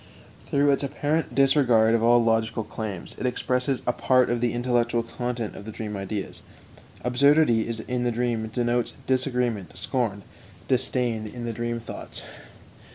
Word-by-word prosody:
Through 140 0 +3
its 140 - +1
apparent 145 +3 -1
disregard 130 -5 +4
of 115 - +3
all 120 +1 +5
logical 110 0 +1
claims, 105 -5 -6
it 130 - 0
expresses 125 +1 -1
a 125 - +1
part 130 -2 +3
of 120 -1 0
the 120 -1 +2
intellectual 120 -1 +1
content 120 -1 -4
of - - -9
the 110 - -7
dream 105 -1 -5
ideas. 100 +1 -5 0.6
Absurdity 125 -1 +4 0.2
in 125 -1 -1
the 120 - +1
dream 115 -1 -1
denotes 120 0 0
disagreement, 125 -6 0
scorn, 110 -6 -1 0.4
disdain 125 -4 0
in 120 +2 -7
the 115 - -3
dream 120 +1 -2
thoughts. 115 - -8
120 Hz, 150 wpm, -25 LUFS, 110-125 Hz, 0.6 s, all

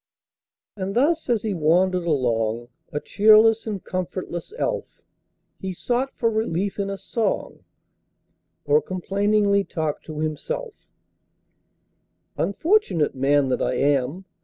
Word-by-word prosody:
And 195 -1 -4
thus 305 +4 +2
as 230 -4 +1
he 215 -2 -1
wandered 180 +2 +2
along, 120 -5 0 0.2
A 145 - -2
cheerless 220 +5 +5
and 205 -4 -4
comfortless 180 - -4
elf, - - -3 0.6
He 190 -1 -4
sought 245 +8 -1
for 230 -1 +1
relief 205 -3 -1
in 200 0 -1
a 195 - -4
song, 220 0 -2 1.0
Or 145 +1 +4
complainingly 200 +2 +1
talked 155 -5 -4
to 155 -2 -7
himself:— 430 - -4 1.5
"Unfortunate 200 - +1
man 135 +1 +2
that - - 0
I - - 0
am! 145 +6 0
190 Hz, 115 wpm, -23 LUFS, 155-220 Hz, 1.5 s, cheerless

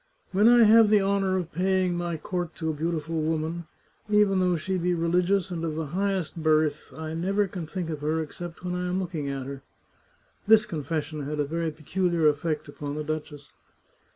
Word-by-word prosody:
" - - -40
When 205 +4 +4
I 240 -1 +7
have 220 0 +7
the 210 -1 +5
honour 195 -1 +1
of 175 -2 -4
paying 185 +1 +1
my 175 -1 -2
court 175 0 -4
to 160 -1 -2
a - - -4
beau 160 +3 -2
tiful 160 0 -2
woman, 160 +1 -2 0.4
even 210 -2 +4
though 180 -1 +2
she 185 +4 -2
be 175 +1 +1
religious 180 +3 +1
and 165 -2 -3
of 160 -2 -2
the 160 0 -2
high 200 +2 +1
est 170 -2 -4
birth, 155 -1 +1
I 160 0 -5
never 195 +5 +1
can 180 -4 -6
think 175 -1 -4
of 150 -2 -5
her 155 +2 0
except 165 +3 -7
when 180 - -2
I 180 0 -2
am 180 +1 -1
looking 165 -6 -3
at 135 -1 -4
her." 135 0 -7 0.9
This 215 0 +6
confession 155 0 -3
had 150 0 -3
a 145 - +2
very 165 +3 -2
peculiar 165 +2 0
effect 150 +1 0
upon 145 0 -6
the 150 - -3
duchess. 150 -2 -5
170 Hz, 210 wpm, -26 LUFS, 155-185 Hz, 0.9 s, I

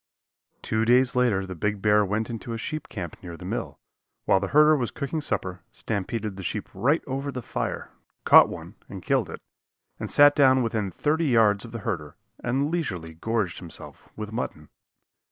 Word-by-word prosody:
Two 110 0 0
days 125 +2 +4
later 115 -6 +2
the 95 - -6
big 105 +4 -2
bear 105 +1 +4
went 105 +3 -1
into 115 +1 -5
a - - -3
sheep 155 +7 -5
camp 85 -6 -6
near 85 -2 -8
the - - -10
mill, - - -4 0.5
while 95 - +4
the 95 - -2
herder 150 +6 +6
was 125 -5 -1
cooking 155 +2 -4
supper, 95 -10 -3
stampeded 105 -1 -3
the - - -6
sheep 90 - -4
right 145 +6 +1
over 135 +1 -3
the 125 -2 -6
fire, - - -4 0.3
caught - - +8
one - - -8 0.2
and - - -8
killed - - +1
it, - - -9 0.6
and - - -4
sat 145 0 +6
down 130 -3 +5
within 110 -4 -1
thirty 155 - 0
yards 110 -4 +3
of 115 - -10
the 115 - -5
herder 80 -10 -3 0.3
and 135 +5 0
leisurely 95 - -3
gorged 105 +1 -2
himself 85 -3 -9
with 105 0 -6
mutton. 75 -10 -5
115 Hz, 185 wpm, -26 LUFS, 95-130 Hz, 0.6 s, caught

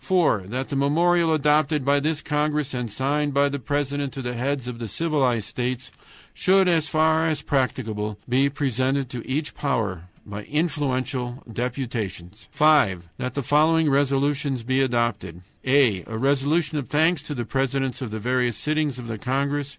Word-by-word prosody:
"(4) 170 - +2
That 130 +5 -4
the 140 - -3
memorial 165 +4 +3
adopted 150 -1 +2
by 140 +1 +4
this 155 +1 -1
congress 150 -2 0
and 125 -3 -3
signed 140 +5 -1
by 140 0 +4
the 140 0 -3
president 145 +1 -2
to 135 - -6
the 125 0 -3
heads 130 +1 -2
of 120 -2 -6
the 115 - -4
civilized 130 -7 0
states 125 +2 -3 0.4
should, 190 0 +3
as 165 -4 +2
far 160 +1 +3
as 155 -2 -1
practicable, 110 -6 -1
be 130 +3 +3
presented 135 -1 -1
to 120 -2 -5
each 150 +3 -2
power 105 - -2 0.2
by 105 0 -6
influential 130 -5 -2
deputations. 115 -6 -4
"(5) 115 - +3
That 125 -1 -4
the 140 - -1
following 155 +3 +3
resolutions 140 -1 +1
be 130 +3 +1
adopted: 115 -9 -1 0.2
"a. 130 -9 +3
A 110 - -5
resolution 145 +4 +1
of 135 - -6
thanks 160 +2 +2
to 150 0 -6
the 120 -2 -3
presidents 135 +1 -1
of 125 - -3
the 110 +1 -5
various 125 0 0
sittings 150 -3 -1
of 125 - -7
the 115 -2 -5
congress. 140 +3 -1
135 Hz, 165 wpm, -24 LUFS, 120-150 Hz, 0.4 s, by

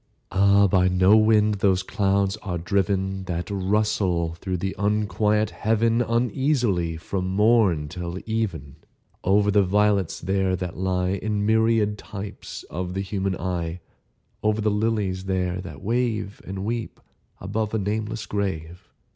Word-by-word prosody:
Ah, 100 +1 +5
by 90 -1 +3
no 95 +3 +5
wind 110 -1 +4
those 95 -2 +2
clouds 100 0 +1
are 95 -5 -4
driven 95 +2 -1
That 90 +2 -4
rustle 95 -4 0
through 90 +2 -4
the 95 +2 -3
unquiet 105 +1 +1
Heaven 115 +2 +1
Uneasily, 115 - 0
from 90 +3 -3
morn 100 -5 +3
till 85 +2 -5
even, 95 -11 -3 0.5
Over 100 +2 +3
the 100 0 +5
violets 100 -1 +1
there 95 +1 0
that 90 -1 -5
lie 90 0 0
In 100 +2 -1
myriad 110 -1 +2
types 100 -1 -8
of 90 +2 -5
the 95 - -1
human 95 -1 -2
eye— 85 -1 -3 0.6
Over 110 0 +1
the 105 0 +1
lilies 105 -3 -1
there 90 -1 -1
that 95 - -10
wave 115 -2 -1
And 95 +1 -5
weep 115 +1 -3 0.4
above 105 +3 -2
a - - +2
nameless 105 +1 -2
grave! 90 -4 -4
100 Hz, 140 wpm, -24 LUFS, 90-105 Hz, 0.6 s, Ah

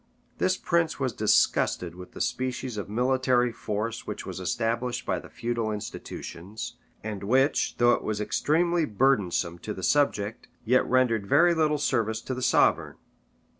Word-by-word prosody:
This 185 0 +2
prince 170 -3 0
was 130 -3 -1
disgusted 105 -4 +2
with 90 +1 -11
the - - -7
species 130 -1 -2
of 105 -1 -5
military 125 +1 +2
force 115 0 -4
which - - -5
was - - -6
established 120 +4 -2
by - - -1
the - - -13
feudal 115 -2 -2
institutions, 105 -1 -7 0.3
and 105 -3 -5
which, 130 +7 +2
though 120 0 +5
it - - -1
was 105 -1 -2
extremely 165 +9 +1
burdensome 100 - +1
to 85 - -5
the 95 - -8
subject, 110 -4 +1 0.2
yet 125 +3 +4
rendered 120 -5 +2
very 170 - +5
little 155 -2 +2
service 115 -6 0
to 130 - -4
the 130 - -5
sovereign. - - +2
120 Hz, 155 wpm, -27 LUFS, 105-130 Hz, 0.3 s, though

